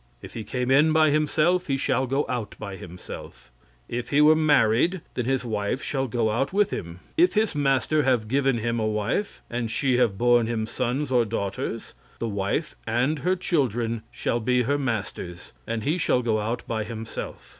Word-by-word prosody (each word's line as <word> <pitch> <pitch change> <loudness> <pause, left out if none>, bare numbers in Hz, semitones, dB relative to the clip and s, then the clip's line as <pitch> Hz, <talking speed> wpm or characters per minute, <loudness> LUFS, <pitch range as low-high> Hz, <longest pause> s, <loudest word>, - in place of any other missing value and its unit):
If - - -11
he 110 - -5
came 125 +4 -2
in 150 +4 +5
by 155 -1 +4
himself, 155 +4 +2
he 135 -2 +1
shall 130 -1 0
go 135 +3 0
out 120 -5 -3
by 100 -1 -6
himself; 90 -7 -10 0.4
if 120 0 -4
he 140 - +3
were 150 +1 +7
married, 155 - +3
then 125 - -2
his 130 0 0
wife 105 +3 -2
shall 135 -2 -1
go 115 -2 0
out 120 +6 0
with 205 +1 +2
him. 85 +1 -6 0.2
If 350 +2 +5
his 215 -3 +2
master 140 0 +2
have 125 -5 +1
given 135 +1 +2
him 115 +1 -1
a 110 - 0
wife, 110 - -2
and 120 -1 -3
she 130 +1 +1
have 110 -6 +2
borne 120 0 +4
him 115 -2 -1
sons 130 +4 -2
or 125 -2 +4
daughters, 100 -3 -4 0.2
the 115 - -3
wife 100 +9 -2
and 125 +7 +1
her 180 +7 +1
children 120 - 0
shall 120 - -1
be 125 +2 +2
her 140 +4 0
master's, 100 -8 -4
and 115 -2 -2
he 160 +8 0
shall 125 -6 +2
go 110 -2 +1
out 115 +3 -2
by 110 -2 -1
himself. 110 0 -7
125 Hz, 190 wpm, -25 LUFS, 110-145 Hz, 0.4 s, were